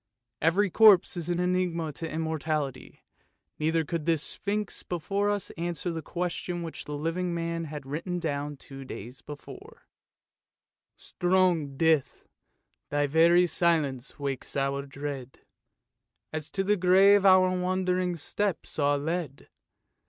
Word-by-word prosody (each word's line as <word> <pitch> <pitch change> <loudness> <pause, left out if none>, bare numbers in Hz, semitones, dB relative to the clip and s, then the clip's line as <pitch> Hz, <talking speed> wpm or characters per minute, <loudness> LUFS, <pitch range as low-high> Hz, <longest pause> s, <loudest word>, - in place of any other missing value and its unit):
Every 185 +5 +2
corpse 210 -4 +6
is 170 -1 -4
an 175 0 0
enigma 180 -3 0
to 165 +2 -5
Immortality, 155 -4 -3 0.6
neither 160 +1 +1
could 165 0 -4
this 165 -2 +2
sphinx 205 +1 -3
before 195 +4 -1
us 205 -2 -2
answer 175 0 -2
the 165 -1 -4
question 175 +1 -3
which 165 - -7
the 150 0 -5
living 170 +3 -2
man 165 0 -2
had 150 -2 -7
written 165 +6 -3
down 145 -3 -3
two 135 0 -10
days 125 0 -9
before 145 -1 -11 0.3
— - - -65
" - - -64
Strong 175 -6 +1
Death, 160 -4 +1 0.6
thy 145 0 +1
very 165 +4 +5
silence 155 -7 0
wakes 140 -3 -5
our 140 0 -1
dread, 135 -2 -7 0.9
As 155 -1 -4
to 195 - -1
the 205 +2 +2
grave 190 +2 +6
our 185 -1 +5
wandering 180 0 0
steps 185 +2 -3
are 145 0 +3
led. 155 -1 -4
165 Hz, 135 wpm, -28 LUFS, 145-180 Hz, 0.9 s, corpse